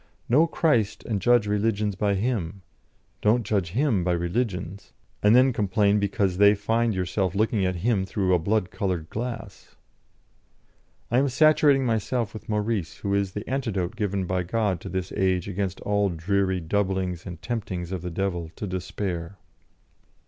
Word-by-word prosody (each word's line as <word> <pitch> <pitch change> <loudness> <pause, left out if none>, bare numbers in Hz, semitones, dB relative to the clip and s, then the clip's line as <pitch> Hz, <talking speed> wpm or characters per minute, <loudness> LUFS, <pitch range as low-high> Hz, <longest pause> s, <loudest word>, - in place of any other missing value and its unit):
Know 150 +8 +4
Christ 120 - +1
and 105 -4 -2
judge 120 +1 +4
religions 105 0 0
by 100 +1 0
Him; 100 -4 -2 0.6
don't 115 +3 +3
judge 95 -5 -1
Him 120 -7 +2
by 90 0 +1
religions, 90 +1 -3 0.3
and 105 +2 +5
then 130 +1 +5
complain 105 -1 +2
because 100 -2 0
they 100 +1 +6
find 115 +2 0
yourself 95 +1 -1
looking 110 -1 +1
at 90 - -1
Him 100 -6 +1
through 95 -2 0
a 90 - +4
blood 100 +2 0
coloured 90 -6 -3
glass." 115 -4 -6 1.4
"I 120 - +4
am 140 +1 +2
saturating 145 -1 +4
myself 115 0 -1
with 110 - -10
Maurice, 105 -4 -1
who 100 - -2
is 100 -2 0
the 105 - -6
antidote 115 -8 -2
given 100 -3 -1
by 90 +1 0
God 95 -1 -1
to - - -7
this 95 0 -3
age 95 -2 0
against 95 -1 -3
all 105 -1 +1
dreary 95 +2 0
doublings 95 0 -1
and 90 -3 -7
temptings 95 -7 -4
of 95 -3 -3
the 90 - -4
devil 85 -2 -2
to - - -5
despair." 90 -1 -4
100 Hz, 160 wpm, -25 LUFS, 95-110 Hz, 1.4 s, they